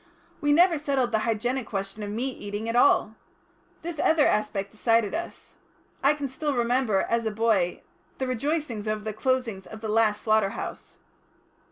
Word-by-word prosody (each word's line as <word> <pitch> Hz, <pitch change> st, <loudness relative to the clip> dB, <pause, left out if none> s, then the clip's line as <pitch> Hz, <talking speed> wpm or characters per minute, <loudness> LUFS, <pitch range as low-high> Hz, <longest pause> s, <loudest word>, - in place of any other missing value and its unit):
We 290 Hz, -, +2 dB
never 335 Hz, +1 st, +5 dB
settled 275 Hz, -4 st, 0 dB
the 220 Hz, -, +2 dB
hygienic 230 Hz, +3 st, -1 dB
question 195 Hz, +1 st, -4 dB
of 205 Hz, -, -4 dB
meat 240 Hz, +6 st, -2 dB
eating 205 Hz, +2 st, -5 dB
at 230 Hz, -, -2 dB
all. 220 Hz, -3 st, +4 dB, 0.7 s
This 335 Hz, -2 st, -5 dB
other 315 Hz, -1 st, +4 dB
aspect 200 Hz, -2 st, 0 dB
decided 225 Hz, -1 st, +1 dB
us. 340 Hz, +1 st, -6 dB, 0.5 s
I 285 Hz, +2 st, +5 dB
can 290 Hz, -2 st, -3 dB
still 285 Hz, +2 st, -2 dB
remember, 240 Hz, -4 st, +2 dB
as 230 Hz, -1 st, 0 dB
a -, -, -1 dB
boy, 210 Hz, -5 st, +1 dB, 0.3 s
the 265 Hz, -, -2 dB
rejoicings 255 Hz, -3 st, -2 dB
over 215 Hz, 0 st, -2 dB
the 215 Hz, 0 st, -4 dB
closing 250 Hz, -4 st, -1 dB
of 220 Hz, -, -9 dB
the 220 Hz, -, -4 dB
last 215 Hz, -1 st, +2 dB
slaughter 215 Hz, -2 st, +3 dB
house." -, -, -7 dB
230 Hz, 170 wpm, -26 LUFS, 215-265 Hz, 0.7 s, never